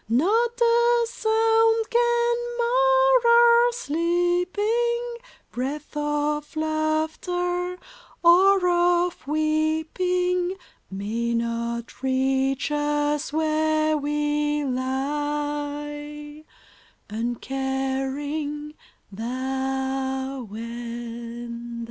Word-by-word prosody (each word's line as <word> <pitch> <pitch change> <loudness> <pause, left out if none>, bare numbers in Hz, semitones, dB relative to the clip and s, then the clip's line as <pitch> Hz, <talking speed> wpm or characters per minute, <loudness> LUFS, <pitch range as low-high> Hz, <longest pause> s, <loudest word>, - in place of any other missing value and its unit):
Not 445 - +2
a 470 0 +4
sound 450 0 +2
can 475 0 +2 0.2
mar - - +4
our 475 0 +6
sleeping 410 +6 0 0.4
Breath 280 +5 -5
of 295 +1 -1
laughter, 315 +3 -1 0.5
or 370 +2 +6
of 350 -2 +1
weeping, 320 +4 0 0.3
May 225 +5 -2
not 235 0 -3
reach 265 +1 0
us 295 0 0
where 310 0 +1
we 295 0 0
lie 295 +2 -3 0.6
Uncaring 270 +5 -3 0.2
— - - -40
thou 265 +2 -3
and 235 +1 -7
I - - -8
295 Hz, 70 wpm, -24 LUFS, 265-360 Hz, 0.6 s, our